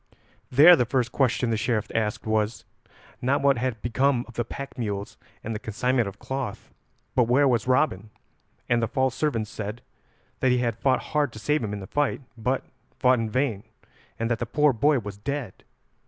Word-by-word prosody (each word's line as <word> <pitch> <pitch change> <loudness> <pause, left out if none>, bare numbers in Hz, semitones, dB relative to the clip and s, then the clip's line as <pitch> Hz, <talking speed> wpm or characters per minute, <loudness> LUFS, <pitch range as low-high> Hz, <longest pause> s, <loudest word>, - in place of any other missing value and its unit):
There 155 +7 +8
the 125 - +2
first 125 -2 0
question 125 -2 +1
the 110 - +1
Sheriff 110 -1 0
asked 110 -2 -1
was, 110 +1 -1 0.6
not 140 +3 +1
what 140 -3 +4
had 125 -3 -2
become 125 +1 +1
of 120 - -13
the 120 - -1
pack 140 +4 -8
mules 105 -5 -4 0.3
and 115 - -3
the 105 - -4
consignment 120 +2 0
of 100 +1 -7
cloth, 130 -2 -5 0.4
but 125 -2 +4
where 135 +4 +4
was 125 -2 +1
Robin, 125 -6 +1 0.6
and 120 -1 +2
the 115 - +1
false 130 0 0
servant 115 -8 -1
said 105 +2 -6 0.6
that 130 - +2
he 125 - +3
had 115 -2 -1
fought 130 -2 +2
hard 150 -4 +2
to - - -10
save 150 +4 0
him 105 - -3
in 105 -1 -5
the - - -7
fight, 145 +7 -1
but 125 +3 -1 0.3
fought 125 -1 +4
in 115 -1 -2
vain, 120 -4 -1 0.5
and 115 - -1
that 115 - 0
the 120 - -3
poor 150 +3 +3
boy 145 +6 +3
was 105 -4 -6
dead. 135 -3 -5
120 Hz, 195 wpm, -25 LUFS, 110-135 Hz, 0.6 s, There